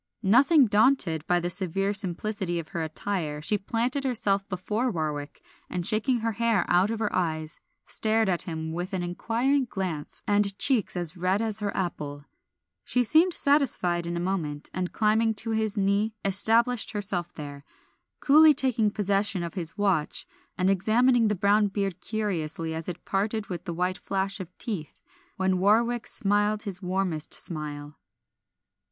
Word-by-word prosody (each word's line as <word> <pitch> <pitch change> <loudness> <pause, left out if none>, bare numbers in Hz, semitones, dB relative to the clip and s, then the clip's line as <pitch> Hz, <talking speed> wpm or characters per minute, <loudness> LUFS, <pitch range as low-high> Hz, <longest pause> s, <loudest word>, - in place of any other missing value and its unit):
Nothing 265 - +5
daunted 205 - +2
by 175 0 +3
the 175 +1 -2
severe 195 +2 -1
simplicity 195 -2 -2
of 160 -2 -5
her 170 - -4
attire 160 -1 -3
she 205 +7 0
planted 235 +7 -1
herself 205 -6 -1
before 210 +7 -1
Warwick, 150 -6 -4 0.3
and 180 -2 -3
shaking 230 +3 +2
her 230 0 0
hair 225 -3 +1
out 180 +3 +3
of 225 - -2
her 215 -1 -2
eyes 155 -3 -2 0.3
stared 220 0 0
at 180 -3 +4
him 160 -2 -4
with 180 +4 -4
an 185 -2 -1
inquiring 235 +10 0
glance 185 -9 -5
and 205 -1 +1
cheeks 250 -9 +3
as 175 -1 0
red 185 +3 0
as 220 -1 0
her 205 -1 -2
apple. 145 -6 -4 0.6
She 250 - +1
seemed 325 +8 +3
satisfied 225 - +1
in 170 0 -3
a - - -2
moment, 170 -5 -3
and 180 0 -3
climbing 220 +1 +2
to 225 +2 +1
his 220 -1 0
knee 200 +2 +1
established 225 +5 +3
herself 190 -4 -3
there, 145 -2 -8 0.6
coolly 305 +1 +6
taking 250 -6 +2
possession 200 -2 0
of 170 - -5
his 175 0 -3
watch, 195 -7 0 0.3
and 185 - +1
examining 225 +5 +3
the 210 - +1
brown 205 +3 +3
beard 195 -2 -3
curiously 165 -7 -2
as 160 +2 -4
it 175 0 -8
parted 210 +2 -2
with 175 -3 -6
the 170 - -4
white 180 +2 -1
flash 195 +1 -2
of 185 -3 -7
teeth, 185 -10 -5 0.4
when 190 -1 +1
Warwick 230 +5 +2
smiled 205 +1 +1
his 195 -3 -5
warmest 180 -4 -2
smile. 150 -2 -5
195 Hz, 160 wpm, -26 LUFS, 175-220 Hz, 0.6 s, coolly